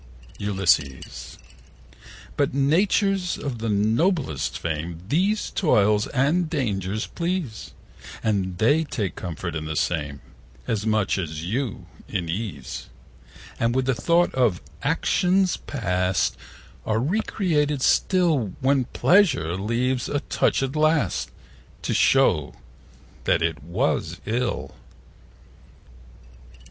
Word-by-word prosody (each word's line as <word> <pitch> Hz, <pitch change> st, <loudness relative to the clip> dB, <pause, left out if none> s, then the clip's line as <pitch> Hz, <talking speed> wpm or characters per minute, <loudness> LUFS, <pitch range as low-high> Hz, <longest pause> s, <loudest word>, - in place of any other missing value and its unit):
40 -, -, -5 dB, 0.6 s
Ulysses.But 65 Hz, -, -8 dB
natures 185 Hz, +6 st, +2 dB
of 130 Hz, -5 st, -4 dB
the 115 Hz, 0 st, -2 dB
noblest 110 Hz, -, +1 dB
frame 80 Hz, +1 st, -4 dB
These 190 Hz, -, +1 dB
toils 105 Hz, -, +3 dB
and 155 Hz, +6 st, +1 dB
dangers 110 Hz, -, -1 dB
please; 170 Hz, -10 st, -4 dB, 0.5 s
And 95 Hz, -4 st, 0 dB
they 145 Hz, -, +3 dB
take 105 Hz, -, -3 dB
comfort 85 Hz, -1 st, -5 dB
in 80 Hz, -1 st, -3 dB
the 80 Hz, 0 st, -4 dB
same 75 Hz, -4 st, -1 dB, 0.4 s
As 110 Hz, -1 st, -1 dB
much 110 Hz, -3 st, +1 dB
as 80 Hz, -3 st, -4 dB
you 110 Hz, 0 st, -3 dB, 0.2 s
in 90 Hz, -5 st, -3 dB
ease; 100 Hz, 0 st, -5 dB, 0.7 s
And 115 Hz, +1 st, +1 dB
with 130 Hz, 0 st, +1 dB
the 130 Hz, -, +2 dB
thought 170 Hz, +8 st, +2 dB
of 120 Hz, -9 st, +2 dB, 0.2 s
actions 180 Hz, +5 st, +2 dB
past 90 Hz, -, 0 dB, 0.5 s
45 110 Hz, -, -1 dB
Are -, -, +2 dB
recreated 150 Hz, -, 0 dB
still: 160 Hz, -, +2 dB
When 135 Hz, -1 st, +2 dB
Pleasure 145 Hz, -, +3 dB
leaves 120 Hz, +6 st, -1 dB
a 145 Hz, -, -1 dB
touch -, -, +1 dB
at 135 Hz, +2 st, -3 dB
last 155 Hz, -, +1 dB, 0.5 s
To -, -, -1 dB
show 90 Hz, -, +3 dB, 0.7 s
that 80 Hz, -, +2 dB
it 80 Hz, -4 st, -1 dB
was 85 Hz, +4 st, -1 dB
ill. 120 Hz, +3 st, -2 dB
115 Hz, 110 wpm, -24 LUFS, 95-150 Hz, 0.7 s, toils